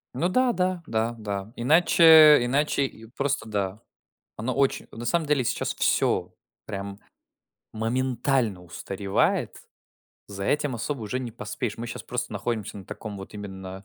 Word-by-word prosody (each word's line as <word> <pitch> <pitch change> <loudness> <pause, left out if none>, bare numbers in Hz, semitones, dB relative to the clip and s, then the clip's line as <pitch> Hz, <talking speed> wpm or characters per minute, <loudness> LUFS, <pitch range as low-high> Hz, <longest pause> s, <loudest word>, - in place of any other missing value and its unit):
Ну 140 +7 +1
да, 255 +4 +2
да, 185 -2 0
да, 115 +1 -1
да, 100 0 -5
иначе 155 +1 +7
иначе 140 +2 +1
и 115 -3 -9
просто 135 0 -2
да. 100 -1 -2 0.6
Оно 120 +4 -2
оч 140 -1 +2
на 115 - -7
самом 160 +6 +1
деле, 145 -3 +2
сейчас - - -1
всё - - +1 0.3
прям 100 -1 -6 0.7
моментально 120 -2 0
устаревает. 95 +3 -1 0.7
За 100 -1 -6
этим 145 +1 0
особо 125 +2 -3
уже 110 +4 -3
не 125 -2 -5
поспеешь. 115 0 -5
Мы 120 - -4
щас - - -6
просто 125 -2 -4
находимся 105 0 -3
на 95 - -10
таком 105 +2 -7
вот 95 +2 -10
именно 95 -1 -8
115 Hz, 145 wpm, -26 LUFS, 105-140 Hz, 0.7 s, иначе